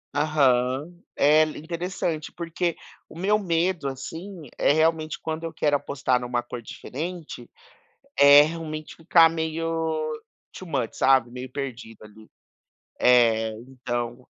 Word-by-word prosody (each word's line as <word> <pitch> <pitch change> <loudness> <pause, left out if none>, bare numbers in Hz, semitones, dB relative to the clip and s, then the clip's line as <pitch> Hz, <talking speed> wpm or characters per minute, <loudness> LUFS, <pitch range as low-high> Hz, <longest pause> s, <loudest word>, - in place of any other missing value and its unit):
Aham. 145 +2 +1 0.2
É 150 +2 +5
interessante, 165 +1 -4
porque 170 0 -3 0.3
o - - -13
meu 200 +4 +2
medo, 170 -4 0
assim, 160 +5 -7
é - - +3
realmente 155 0 +1
quando 160 0 -5
eu 165 - -5
quero 145 -1 +1
apostar 140 -2 0
numa 120 0 -2
cor 120 0 -7
diferente, 160 +8 -7 0.7
é 140 +1 +9
realmente 155 -1 -5
ficar 165 0 +5
meio 160 -1 -2 0.4
too 185 - -10
much 130 -7 -2
sabe, 130 -3 +3
meio 125 +1 -8
perdido 120 -5 -7
ali. 110 +1 -16 0.7
É, 115 -3 +4 0.2
então 120 -1 -5
155 Hz, 120 wpm, -25 LUFS, 130-165 Hz, 0.7 s, é